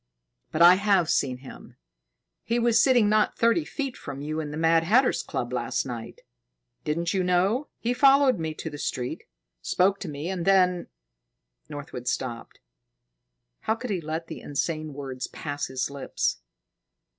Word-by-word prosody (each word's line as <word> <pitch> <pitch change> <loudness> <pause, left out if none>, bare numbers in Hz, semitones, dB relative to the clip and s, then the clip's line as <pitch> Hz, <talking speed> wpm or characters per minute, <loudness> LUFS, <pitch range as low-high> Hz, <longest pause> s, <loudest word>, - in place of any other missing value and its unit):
"But 165 - +3
I 180 +2 +9
have 195 -6 +3
seen 130 -2 +1
him. 130 +1 -13 0.7
He 235 - 0
was 235 -1 +4
sitting 245 -5 +4
not 215 0 +2
thirty 230 +8 +3
feet 275 -4 -4
from 135 - -8
you 155 +2 -3
in 155 -2 -4
the 150 - -6
Mad 165 0 +3
Hatter's 245 +9 +3
Club 120 0 -4
last 120 -2 -1
night. 120 -3 -7 0.6
Didn't 170 +3 -1
you 190 -2 +1
know? 190 +10 +1
He 240 +2 -1
followed 270 -3 +5
me 160 -1 -3
to 160 - -5
the 145 - -8
street, 125 -4 -3 0.4
spoke 195 +2 +2
to - - -5
me, 145 +2 -5
and 185 -2 -3
then 180 -1 +3 0.4
" - - -48
Northwood 140 -4 -7
stopped. 120 -2 -4 1.0
How 220 - 0
could 245 0 -6
he 185 -3 -1
let 160 +1 -4
the - - -8
insane 155 +1 -3
words 135 -2 -5
pass 145 -1 -5
his 130 +1 -3
lips? 140 -1 -2
165 Hz, 165 wpm, -26 LUFS, 140-210 Hz, 1.0 s, I